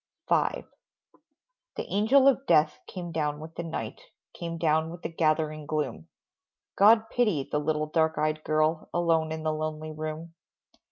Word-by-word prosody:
V. -, -, +2 dB, 1.4 s
The -, -, -4 dB
Angel 250 Hz, +7 st, +5 dB
of 275 Hz, 0 st, +3 dB
Death 155 Hz, 0 st, +3 dB
came 175 Hz, -2 st, -6 dB
down 150 Hz, -2 st, -1 dB
with 160 Hz, +1 st, -9 dB
the -, -, -5 dB
night, 165 Hz, -, -5 dB, 0.3 s
Came 170 Hz, -1 st, -5 dB
down 160 Hz, 0 st, +1 dB
with 170 Hz, +1 st, -10 dB
the 165 Hz, -, -5 dB
gathering 155 Hz, -1 st, 0 dB
gloom; 145 Hz, -, -3 dB, 0.7 s
God 220 Hz, +2 st, +6 dB
pity 210 Hz, -, +1 dB
the 150 Hz, -, +1 dB
little 155 Hz, 0 st, 0 dB
dark 160 Hz, +1 st, +1 dB
eyed 155 Hz, 0 st, 0 dB
girl, 155 Hz, +1 st, 0 dB
Alone 165 Hz, -2 st, +2 dB
in 160 Hz, 0 st, -4 dB
the 155 Hz, 0 st, 0 dB
lonely 155 Hz, 0 st, -4 dB
room. 155 Hz, +2 st, -6 dB
160 Hz, 155 wpm, -27 LUFS, 155-170 Hz, 1.4 s, God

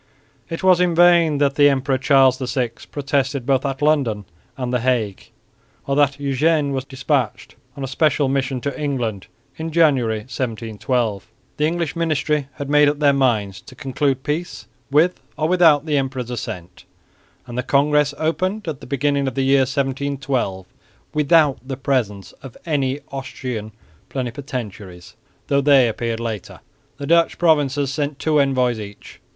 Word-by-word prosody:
It 165 Hz, +3 st, -5 dB
was 185 Hz, -1 st, +5 dB
in 175 Hz, -2 st, +2 dB
vain 170 Hz, -3 st, +5 dB
that 140 Hz, -1 st, +2 dB
the 145 Hz, 0 st, +5 dB
Emperor 135 Hz, -1 st, 0 dB
Charles 135 Hz, -1 st, +4 dB
VI 125 Hz, -2 st, -1 dB, 0.2 s
protested 140 Hz, -2 st, -1 dB
both 135 Hz, -1 st, +2 dB
at 135 Hz, +1 st, -4 dB
London 130 Hz, -9 st, +1 dB, 0.3 s
and 125 Hz, -1 st, -3 dB
the 125 Hz, -, +2 dB
Hague, 115 Hz, -5 st, -1 dB, 0.6 s
or 140 Hz, -, -1 dB
that 145 Hz, -1 st, +2 dB
Eugene 145 Hz, +2 st, +1 dB
was 135 Hz, -1 st, -3 dB
despatched 135 Hz, -3 st, -2 dB, 0.2 s
on 140 Hz, -, -5 dB
a -, -, -2 dB
special 145 Hz, +1 st, +1 dB
mission 135 Hz, -1 st, -1 dB
to 140 Hz, +3 st, -4 dB
England 120 Hz, -9 st, -2 dB, 0.3 s
in 160 Hz, +1 st, -4 dB
January, 135 Hz, -10 st, +2 dB
1712. 115 Hz, -2 st, -3 dB, 0.3 s
The 150 Hz, -, +2 dB
English 170 Hz, -1 st, -2 dB
ministry 150 Hz, -3 st, 0 dB
had 140 Hz, -, -5 dB
made 150 Hz, 0 st, +5 dB
up 145 Hz, -, -2 dB
their 145 Hz, -1 st, +4 dB
minds 110 Hz, -8 st, 0 dB
to 130 Hz, -, -14 dB
conclude 135 Hz, 0 st, -1 dB
peace 160 Hz, +4 st, -4 dB, 0.2 s
with 155 Hz, +6 st, +2 dB, 0.2 s
or 155 Hz, -, 0 dB
without 165 Hz, -4 st, +4 dB
the 150 Hz, -2 st, +1 dB
emperor's 130 Hz, -2 st, -4 dB
assent; 90 Hz, -6 st, -7 dB, 0.6 s
and 120 Hz, -2 st, -9 dB
the 125 Hz, -, 0 dB
congress 145 Hz, +2 st, +2 dB
opened 185 Hz, +6 st, -1 dB
at 150 Hz, -4 st, -4 dB
the -, -, -10 dB
beginning 140 Hz, +1 st, 0 dB
of 130 Hz, -, -3 dB
the 135 Hz, -, 0 dB
year 135 Hz, 0 st, +4 dB
1712 135 Hz, -7 st, -2 dB, 0.5 s
without 150 Hz, -2 st, +3 dB
the 130 Hz, 0 st, -6 dB
presence 120 Hz, -8 st, -1 dB
of 135 Hz, -3 st, -11 dB
any 140 Hz, -4 st, 0 dB
Austrian 125 Hz, -5 st, -5 dB, 0.4 s
plenipotentiaries, 115 Hz, -8 st, -6 dB, 0.3 s
though 140 Hz, 0 st, +2 dB
they 140 Hz, -3 st, +5 dB
appeared 115 Hz, 0 st, -3 dB
later. 115 Hz, -4 st, -6 dB, 0.4 s
The 140 Hz, -, -6 dB
Dutch 170 Hz, +2 st, +3 dB
provinces 145 Hz, -4 st, +2 dB
sent 145 Hz, -1 st, -2 dB
two 155 Hz, 0 st, +1 dB
envoys 130 Hz, -4 st, +1 dB
each. 100 Hz, -1 st, -10 dB
135 Hz, 155 wpm, -20 LUFS, 125-150 Hz, 0.6 s, was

